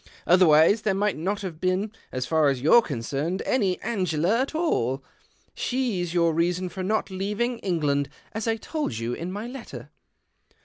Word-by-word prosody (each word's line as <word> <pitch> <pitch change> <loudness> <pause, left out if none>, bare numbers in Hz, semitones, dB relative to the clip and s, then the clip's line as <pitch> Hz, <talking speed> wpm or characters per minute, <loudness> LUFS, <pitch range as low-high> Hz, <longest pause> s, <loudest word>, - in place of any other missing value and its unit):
Otherwise 175 +3 +5
there 195 -3 +1
might 205 0 +1
not 195 +6 -2
have 175 -5 -6
been, 185 +3 0 0.2
as 130 0 -2
far 160 -1 +3
as 135 -2 -1
you're 160 - +6
concerned, 145 - -3
any 195 -8 +1
Angela 190 -2 0
at 275 +4 -3
all. 135 - 0 0.5
She's 230 -10 -1
your 170 -1 +2
reason 175 +3 0
for 190 - -6
not 205 +1 -1
leaving 210 +6 -2
England, 145 -6 0 0.2
as 220 +1 -3
I 225 - +2
told 225 - -3
you 115 +1 -2
in 170 +7 -5
my 205 +3 -5
letter." 250 0 -9
185 Hz, 165 wpm, -25 LUFS, 155-215 Hz, 0.5 s, you're